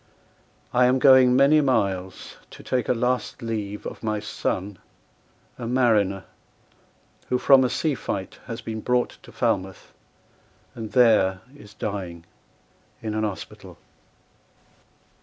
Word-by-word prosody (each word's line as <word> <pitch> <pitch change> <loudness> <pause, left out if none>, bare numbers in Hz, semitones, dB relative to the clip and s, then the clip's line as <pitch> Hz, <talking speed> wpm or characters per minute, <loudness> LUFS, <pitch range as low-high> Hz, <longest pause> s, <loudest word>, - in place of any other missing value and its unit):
I 125 0 +4
am 130 +1 +3
going 130 -2 +6
many 140 +3 +5
miles 95 -9 -1
to - - -13
take 125 -3 -1
A - - +4
last 125 +1 -2
leave 105 -3 -4
of - - -7
my 110 -1 -2
son, 100 -2 -4 0.8
a 120 - -5
mariner, 110 -6 +2 1.1
Who 125 - +2
from 130 +1 +5
a 125 - +1
sea 155 +3 -1
fight 95 -6 -5
has 115 -1 -6
been 110 -1 -5
brought 125 +1 -1
to - - -15
Falmouth, 95 -1 -2 0.8
And 110 -2 -8
there 105 -7 +4
is 105 -7 -15
dying 95 -6 -5 0.8
in 110 -1 -3
an 110 0 -1
hospital." 105 -3 -7
110 Hz, 125 wpm, -24 LUFS, 100-125 Hz, 1.1 s, going